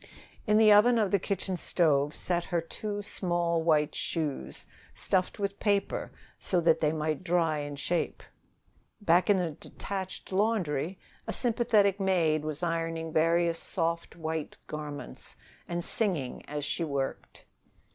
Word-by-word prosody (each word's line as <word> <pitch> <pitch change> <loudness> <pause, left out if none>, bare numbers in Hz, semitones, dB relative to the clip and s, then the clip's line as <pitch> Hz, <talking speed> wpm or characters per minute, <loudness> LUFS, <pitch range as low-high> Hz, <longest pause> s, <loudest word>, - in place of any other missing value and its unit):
In 210 0 +5
the 215 -1 +7
oven 225 +4 +6
of 210 -4 +2
the 200 - +3
kitchen 190 0 -2
stove 150 -4 +2
sat 175 -1 -1
her 175 -2 0
two 205 +5 -5
small 175 -4 0
white 155 -2 +2
shoes, 140 - -3 0.3
stuffed 185 -1 0
with 200 -1 -3
paper 200 -2 0 0.3
so 180 - +1
that 165 -1 +3
they 150 -1 +3
might 155 0 -2
dry 165 -3 +1
in 145 0 -5
shape. 170 +4 -2 0.8
Back 180 -1 +3
in 205 - +6
a 175 -3 0
detached 190 +6 -6
laundry, 185 -5 0 0.3
a - - -1
sympathetic 220 -5 +2
maid 170 -6 +2
was 155 +2 -4
ironing 165 -1 -2
various 165 +1 +3
soft 170 -2 -2
white 160 -2 -4
garments, 150 - -7 0.3
and 175 0 -2
singing 170 - -1
as 145 0 -3
she 170 - -1
worked. 140 -4 -4
170 Hz, 140 wpm, -29 LUFS, 155-195 Hz, 0.8 s, the